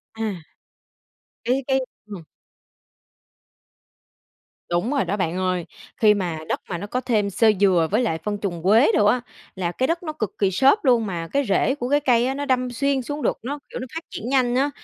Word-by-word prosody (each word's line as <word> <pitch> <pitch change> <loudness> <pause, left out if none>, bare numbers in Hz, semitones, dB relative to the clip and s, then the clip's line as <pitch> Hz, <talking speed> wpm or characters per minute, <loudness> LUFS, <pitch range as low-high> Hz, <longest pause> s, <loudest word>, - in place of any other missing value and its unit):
À. 210 -7 -4 1.0
Cái 255 +3 +1
cái 265 0 +2 0.3
ừm. 200 -6 -9 2.5
Đúng 175 +9 0
rồi 280 -2 +1
đó 205 - -2
bạn 180 -1 -1
ơi. 185 -2 -1 0.3
Khi 215 -2 +5
mà 180 -6 -2
đất - - -1
mà 175 - -2
nó 205 +4 -6
có 250 +4 -2
thêm 215 -6 +1
xơ 215 +3 +4
dừa 180 -5 +4
với 215 +4 +2
lại 165 -9 0
phân 210 -1 -2
trùn 175 -5 -4
quế 215 +4 +5
đồ 205 - +3
á, 245 +4 +3 0.3
là 175 -2 -2
cái 260 +8 -1
đất 335 +1 -1
nó 310 -2 -4
cực 215 - -3
kỳ 195 -2 +2
xốp 270 - +3
luôn, 240 -4 +4
mà 170 -4 -4
cái 280 +10 0
rễ 255 +6 +2
của 245 -3 -4
cái 290 +1 +4
cây 245 -4 +3
á, 265 - 0
nó 285 +1 -4
đâm 255 -2 0
xuyên 275 +2 0
xuống 290 +4 -5
được, - - 0
nó, 285 +4 -4
kiểu, - - -6
nó 255 - -6
phát 325 - -4
triển 235 - -6
nhanh 250 -2 +2
á. 275 +3 +2
225 Hz, 210 wpm, -23 LUFS, 190-265 Hz, 2.5 s, Khi